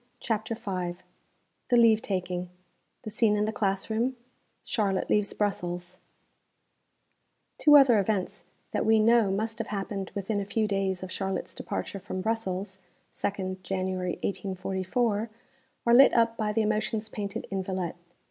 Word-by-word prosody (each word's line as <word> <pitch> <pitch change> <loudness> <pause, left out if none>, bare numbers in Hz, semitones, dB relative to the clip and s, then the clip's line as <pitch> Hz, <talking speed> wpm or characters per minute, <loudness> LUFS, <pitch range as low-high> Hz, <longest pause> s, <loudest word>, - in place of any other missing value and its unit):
CHAPTER 220 0 -2
V 185 -5 -4 0.7
THE 245 - +5
LEAVE 225 -2 +6
TAKING 180 -5 -3 0.5
THE 215 - -6
SCENE 210 -1 +3
IN 210 - +2
THE 215 - -1
CLASS 195 -3 0
ROOM 240 +4 0 0.5
CHARLOTTE 200 -6 0
LEAVES 210 -1 +2
BRUSSELS 180 -3 -2 1.6
Two 295 -1 +8
other 255 -6 +6
events 200 -2 -1 0.3
that - - 0
we 220 0 +4
know 225 -1 +5
must 220 +4 -2
have 230 - -3
happened 195 -1 -4
within 205 +1 -1
a - - -1
few 215 +2 0
days 195 -2 -1
of 185 - -6
Charlotte's 195 -1 -3
departure 200 - -4
from 185 -1 -5
Brussels, 190 -3 -2 0.3
2nd 190 -2 -3
January 185 -1 -2
1844, 200 +4 -1 0.6
are 235 - +4
lit 270 +3 +8
up 230 -1 +3
by 215 -2 -1
the 220 +1 +1
emotions 215 +1 -1
painted 210 0 -5
in 195 -1 -1
_Villette. 185 -2 -3
205 Hz, 145 wpm, -28 LUFS, 190-225 Hz, 1.6 s, Two